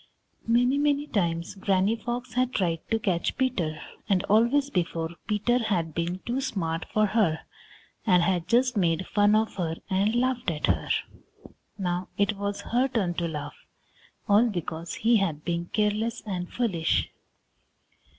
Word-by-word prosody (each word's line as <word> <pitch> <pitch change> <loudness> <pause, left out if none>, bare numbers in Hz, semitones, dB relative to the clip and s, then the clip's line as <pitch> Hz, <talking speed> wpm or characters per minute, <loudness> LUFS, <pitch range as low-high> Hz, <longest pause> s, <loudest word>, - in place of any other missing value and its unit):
Many, 245 +4 +3
many 290 0 +2
times 170 - -1
Granny 195 +2 +1
Fox 240 +1 -5
had 255 +1 0
tried 170 -4 +1
to 225 - +2
catch 185 -6 -1
Peter, 185 - 0 0.3
and 190 -3 +3
always 240 +7 +3
before 165 -2 -1 0.2
Peter 220 +4 +2
had 180 -9 -1
been 170 +3 -2
too 250 +3 -1
smart 175 -11 -2
for 215 0 +3
her, 195 -7 +1 0.6
and 180 -5 +4
had 175 -1 0
just 245 +3 +3
made 175 -2 +1
fun 205 0 +3
of 220 -1 0
her 165 -3 -1 0.2
and 200 +4 +2
laughed 250 -3 +1
at 155 -3 -1
her. - - 0 0.9
Now 180 -2 -2
it 200 +1 +2
was 200 0 -3
her 250 +3 +1
turn 215 -9 0
to 170 0 -2
laugh, 150 -3 -7 0.6
all 210 +4 +5
because 170 -3 -4
he 230 +1 +3
had 165 -7 -1
been 170 -1 -1
careless 215 +3 0
and 180 -4 -4
foolish. 190 -10 0
200 Hz, 150 wpm, -27 LUFS, 175-235 Hz, 0.9 s, all